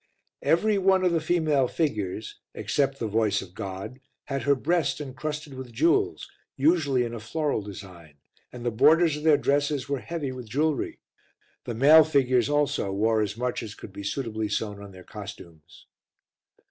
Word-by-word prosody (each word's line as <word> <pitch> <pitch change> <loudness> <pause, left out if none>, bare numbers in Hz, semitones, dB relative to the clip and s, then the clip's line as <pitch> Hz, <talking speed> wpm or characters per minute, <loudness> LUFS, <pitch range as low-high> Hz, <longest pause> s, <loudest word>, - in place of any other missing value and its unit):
Every 205 +5 +2
one 190 0 +3
of 180 - +3
the 165 -1 +1
female 155 -5 +2
figures, 110 - -3 0.2
except 135 -1 0
The 115 - -3
Voice 105 -2 +1
of 90 -2 -14
God, 95 +6 -6 0.2
had 135 -1 -3
her 140 0 +3
breast 165 +3 0
encrusted 150 +2 -5
with 130 -2 -8
jewels, 155 +9 +1 0.3
usually 145 -3 +3
in 120 -1 -4
a 115 - -5
floral 145 +3 -1
design, 95 -6 -11 0.4
and 120 -1 -9
the 120 - +1
borders 160 +7 +4
of - - -7
their 155 -1 +5
dresses 145 -1 0
were 140 -1 -1
heavy 155 -2 -4
with 125 -3 -8
jewellery; 150 +4 -1 0.6
the 120 - -4
male 150 +6 +8
figures 130 -5 +2
also 145 -9 +1
wore 110 +3 +2
as 105 0 -2
much 125 0 -2
as 110 -2 -8
could 100 - -11
be 100 - -7
suitably 110 0 -3
sewn 105 -1 -3
on 100 -1 -10
their 95 -1 -13
costumes. 90 -6 -11
130 Hz, 170 wpm, -26 LUFS, 105-150 Hz, 0.6 s, male